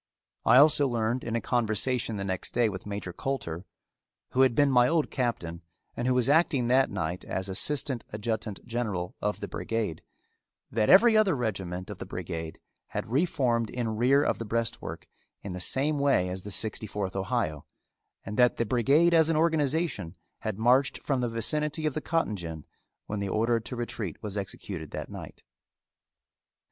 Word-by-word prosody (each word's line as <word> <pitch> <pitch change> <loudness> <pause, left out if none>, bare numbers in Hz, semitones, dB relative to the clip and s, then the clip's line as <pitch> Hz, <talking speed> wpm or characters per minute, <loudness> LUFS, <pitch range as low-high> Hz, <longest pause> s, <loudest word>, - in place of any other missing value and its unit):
I - - +7
also 145 0 +6
learned 120 0 -1
in 115 - -3
a 115 - 0
conversation 115 0 0
the 100 - -3
next 95 -1 -4
day 120 -2 +3
with 95 0 -7
Major 100 -3 -5
Coulter, 95 -11 -4 0.7
who 130 - +2
had 130 -3 +4
been 145 +1 +4
my 125 -1 +5
old 160 0 +1
captain, 85 -10 -2 0.3
and 120 - -2
who 130 - +3
was 125 -2 +3
acting 145 -4 +3
that 130 +1 +4
night 90 -2 -3
as 95 0 -3
assistant 130 +5 0
adjutant 105 -1 -4
general 105 -7 -3
of 105 0 -2
the - - -3
brigade, 110 -8 -3 0.7
that 110 -1 +1
every 220 +4 +7
other 210 -6 +4
regiment 95 -7 -3
of - - -8
the - - -7
brigade 80 -1 -5 0.3
had - - -5
reformed 130 -7 +1
in 115 -3 -2
rear 130 +5 +4
of - - 0
the - - -3
breastwork 115 +1 -3 0.4
in 100 - -5
the 90 - -5
same 140 +10 +1
way 135 -11 +2
as 95 +1 -4
the 105 - -8
Sixty 110 +1 +1
fourth 100 -2 -4
Ohio, 80 -6 -2 0.6
and 105 +2 -5
that 125 -1 +4
the 115 - +1
brigade 140 +9 +3
as 160 -1 +5
an 165 - +2
organization, 155 - 0 0.2
had 110 -3 -4
marched 125 +5 +3
from 135 -3 -1
the 120 - 0
vicinity 150 +7 0
of 155 - +1
the 155 - -3
cotton 165 -11 0
gin 80 -5 -7 0.4
when 105 - -4
the 100 -1 -2
order 115 +3 +2
to 120 +3 -7
retreat 115 -7 -4
was 105 -2 -5
executed 95 -5 -5
that - - -6
night. - - -9
115 Hz, 175 wpm, -28 LUFS, 100-135 Hz, 0.7 s, I